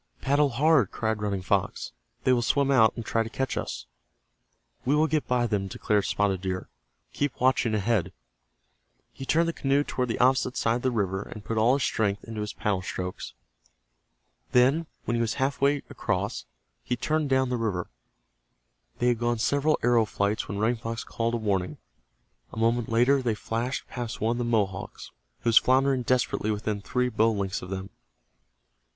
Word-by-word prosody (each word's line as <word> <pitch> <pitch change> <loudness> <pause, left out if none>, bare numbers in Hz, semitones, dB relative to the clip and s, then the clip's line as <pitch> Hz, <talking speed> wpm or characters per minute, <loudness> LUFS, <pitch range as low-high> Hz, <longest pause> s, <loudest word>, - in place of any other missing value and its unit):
"Paddle 145 +1 +2
hard!" 140 - +3
cried 110 -1 -2
Running 100 -3 -2
Fox. 90 - -1 0.3
"They 130 - +4
will 120 - +2
swim 140 +3 +2
out 110 -5 +6
and 115 - -6
try 115 - +1
to 115 - -3
catch 135 +3 -2
us." - - -4 1.0
"We 135 +4 +2
will 155 +1 +4
get 155 -1 0
by 125 -1 +2
them," 105 -4 -1
declared 105 +2 0
Spotted 100 -3 0
Deer. 95 -1 -3 0.4
"Keep 145 -4 -2
watching 125 -3 +2
ahead." 105 -2 0 1.0
He 135 - -8
turned 165 +1 +3
the 165 - -1
canoe 140 0 +1
toward 125 -3 -2
the 115 - -1
opposite 130 0 +2
side 115 +1 +1
of - - -7
the 130 - +1
river, 100 -5 -1
and 105 0 -9
put 115 -1 -1
all 120 +4 +4
his 140 - -1
strength 105 -2 0
into 115 -2 -6
his 105 - -3
paddle 100 -3 -1
strokes. 90 0 -5 1.2
Then, 135 +6 +4 0.2
when 120 - -1
he 120 - +1
was 115 -1 0
half 135 +1 -1
way 140 0 +2
across, - - -2 0.4
he 125 - -1
turned 150 +4 -1
down 130 -1 +2
the 125 - 0
river. 100 - -2 1.1
They 125 - +2
had 120 -2 +1
gone 120 0 0
several 145 +6 +2
arrow 120 -2 +4
flights 105 0 -1
when 100 - -4
Running 115 +3 +1
Fox 115 0 -5
called 115 +1 -2
a - - +1
warning. 100 -5 -1 0.7
A - - -10
moment 115 +1 +1
later 125 +4 +3
they 120 -4 0
flashed 115 +4 -3
past 120 -2 -5
one 110 +2 +1
of 120 - -1
the 120 - -1
Mohawks, 100 -5 -2 0.3
who 120 - +1
was 115 - +8
floundering 130 0 +2
desperately 125 -3 0
within 105 -1 -2
three 125 +5 0
bow 115 -1 +2
lengths 100 -3 -2
of 90 - -8
them. 95 +1 -5
115 Hz, 185 wpm, -27 LUFS, 105-130 Hz, 1.2 s, was